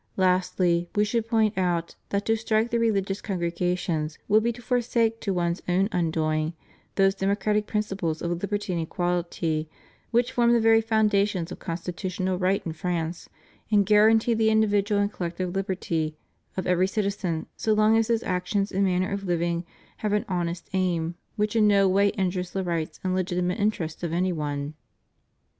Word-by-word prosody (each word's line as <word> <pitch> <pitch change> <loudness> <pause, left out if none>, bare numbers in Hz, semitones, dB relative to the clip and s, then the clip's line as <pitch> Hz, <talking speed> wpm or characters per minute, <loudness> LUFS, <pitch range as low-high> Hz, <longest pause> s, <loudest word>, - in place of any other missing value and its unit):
Lastly, 180 -2 +2
We 210 0 +3
should 225 +1 -1
point 220 -2 +2
out 175 -2 0 0.2
that 200 0 -1
to 225 - +3
strike 220 +1 0
the 235 - +1
religious 200 -3 0
congregations 175 -4 -2
would 215 +1 +5
be 235 +2 +1
to 240 - -12
forsake 235 -2 0
to 200 - -1
one's 175 -1 -1
own 190 +3 +2
undoing 160 -3 0 0.4
those 195 -1 +4
democratic 200 +2 0
principles 195 -7 -2
of 170 - -1
liberty 200 +2 -2
and 170 - -1
equality 170 -2 -1 0.4
which 240 +1 +2
form 235 -1 +3
the 235 - +4
very 225 0 +5
foundation 210 -4 +2
of - - -7
constitutional 185 +1 -3
right 190 +1 +1
in 165 - -3
France 165 0 -3 0.4
and 205 -2 +4
guarantee 220 +3 +5
the 220 -1 +3
individual 205 -1 +2
and 205 +1 0
collective 175 +1 -3
liberty 170 -5 -2 0.4
of 185 - -2
every 180 +1 +3
citizen 195 -5 -2
so 220 - -1
long 215 +1 +4
as 225 -1 +3
his 230 -1 +1
actions 190 +2 -1
and 195 +1 +1
manner 185 0 +1
of 200 0 -3
living 170 -1 0 0.3
have 210 -1 -1
an 210 - +1
honest 175 -2 -2
aim 175 -3 0 0.2
which 210 0 -1
in 215 -2 +5
no 200 -1 +5
way 200 +2 +4
injures 185 -2 -1
the 190 - -3
rights 170 -3 -3
and 185 -1 0
legitimate 180 +1 -1
interests 185 -7 -1
of 170 -2 -3
any 180 +1 +1
one. 145 -2 -3
190 Hz, 170 wpm, -26 LUFS, 175-210 Hz, 0.4 s, would